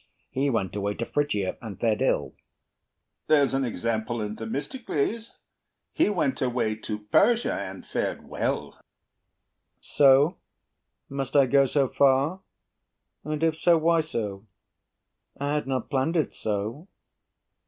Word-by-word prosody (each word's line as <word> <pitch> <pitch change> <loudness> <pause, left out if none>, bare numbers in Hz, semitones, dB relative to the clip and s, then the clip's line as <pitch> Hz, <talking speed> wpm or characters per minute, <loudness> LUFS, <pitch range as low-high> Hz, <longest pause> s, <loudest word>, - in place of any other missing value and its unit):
He 140 +2 0
went 105 -8 -1
away 100 0 -2
to 115 - -3
Phrygia, 105 -11 -1
and 110 -5 -8
fared 115 0 +1
ill. 75 - +1
HAMILTON - - -38 0.9
There's 145 -3 +4
an 135 0 +1
example 115 0 -2
in 105 0 -3
Themistocles: 180 - -3 0.6
He 315 - +3
went 170 -9 0
away 120 -4 0
to 110 -1 -4
Persia, 235 - +3
and - - -6
fared - - -3
well. - - -2
BURR - - -26 1.0
So? 140 +4 +4 0.7
Must 135 -1 -5
I 140 -2 +7
go 140 +1 +4
so 135 +1 +2
far? 140 +8 +2 0.8
And 150 +1 -3
if 160 -1 +1
so, 170 -1 +5
why 165 +1 +3
so? 110 -9 -5 0.9
I 145 +1 -1
had 150 -2 -1
not 130 0 -2
planned 135 +5 0
it 160 - +1
so. 110 - -3
135 Hz, 135 wpm, -26 LUFS, 110-150 Hz, 1.0 s, I